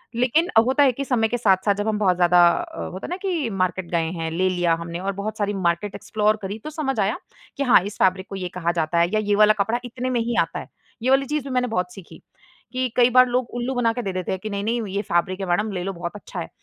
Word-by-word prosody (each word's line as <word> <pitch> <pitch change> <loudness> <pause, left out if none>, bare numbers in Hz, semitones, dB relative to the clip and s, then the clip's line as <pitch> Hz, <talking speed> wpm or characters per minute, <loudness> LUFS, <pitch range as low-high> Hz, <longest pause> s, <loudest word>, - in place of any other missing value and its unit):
लेकिन 255 +9 +2 0.2
होता 265 +3 +4
है 270 - +5
कि 275 +3 -5
समय 235 -4 +2
के 245 +2 -2
साथ-साथ 200 -2 +3
जब 205 +2 -3
हम 215 - +1
बहुत 190 -3 +3
ज़्यादा 175 0 +5
अ, 330 - -3
होता 185 - -7
है - - -10
ना 355 - -3
कि 325 -10 -1
मार्केट 185 -3 -2
गए 165 -2 0
हैं, 165 0 -2
ले 185 +3 +1
लिया 175 -2 +1
हमने 170 0 -5
और 195 +2 -2
बहुत 205 +3 -5
सारी 205 -1 -1
मार्केट 185 +1 -1
एक्सप्लोर 215 0 0
करीं 200 +2 -5
तो - - -5
समझ 285 -6 -2
आया, 195 +1 +1 0.4
कि 280 - 0
हाँ 245 -8 +6
इस 205 - -7
फैब्रिक 190 0 +1
को 195 - -6
ये 185 -2 -3
कहा 170 -1 +1
जाता 170 -1 -1
है, 170 0 +3
या 215 - +3
ये 205 -1 +1
वाला 215 +1 +6
कपड़ा 225 +4 -1
इतने 250 +1 -4
में 250 -2 0
ही 235 +1 -2
आता - - -3
है। - - -9 0.4
ये 255 - +1
वाली 270 +1 +4
चीज़ 300 +1 -2
भी 275 - -7
मैंने 250 0 +1
बहुत 180 -5 -2
सीखी, 190 -4 -13 0.5
कि 255 0 0
कई 245 0 +5
बार 255 +1 +6
लोग 250 -1 -1
उल्लू 245 +2 -2
बना 240 -2 +2
के 245 - -3
दे 195 - -2
देते 185 -1 -3
हैं 190 - -2
कि, 215 - -3
"नहीं, 200 -1 -3
नहीं 230 +3 0
ये 200 - +1
फैब्रिक 185 0 -1
है 195 - -2
मैडम, 210 +5 +1
ले 180 -2 -3
लो 195 +1 -3
बहुत 170 -1 -5
अच्छा 205 - -8
है"। - - -5
205 Hz, 280 wpm, -23 LUFS, 185-245 Hz, 0.5 s, हाँ